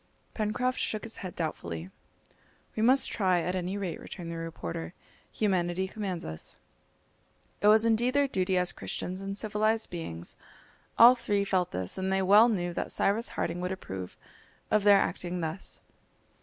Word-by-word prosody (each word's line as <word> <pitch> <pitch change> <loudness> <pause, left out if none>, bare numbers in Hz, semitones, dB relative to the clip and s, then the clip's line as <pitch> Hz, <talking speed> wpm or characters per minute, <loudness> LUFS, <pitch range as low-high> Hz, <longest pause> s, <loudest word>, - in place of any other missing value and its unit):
Pencroft 240 +4 -1
shook 215 - -1
his 230 - -6
head 185 -2 -7
doubtfully. 85 - -4 0.8
"We 215 - -1
must 260 +4 +4
try 185 -4 +2
at 180 - -2
any 185 +1 -2
rate," 185 -5 -4
returned 170 -2 -7
the - - -5
reporter; 85 - -5 0.4
"humanity 185 -3 0
commands 190 -4 -4
us." 80 0 -4 1.1
It 205 - +4
was 215 +1 +6
indeed 235 +3 +2
their 285 -1 +4
duty 185 -6 0
as 180 0 +2
Christians 185 +2 -4
and 195 0 -4
civilised 215 +1 0
beings. 85 - -5 0.6
All 235 +2 +10
three 205 -5 0
felt 185 -3 +1
this, 90 - -3
and 190 0 -1
they 190 0 +2
well 210 +5 +7
knew 175 -5 -1
that - - -3
Cyrus 215 +4 +1
Harding 170 +1 -1
would 180 +1 -2
approve 95 - -6 0.5
of 215 - +4
their 205 -1 +7
acting 180 -2 -1
thus. 160 +3 -4
190 Hz, 160 wpm, -29 LUFS, 175-215 Hz, 1.1 s, All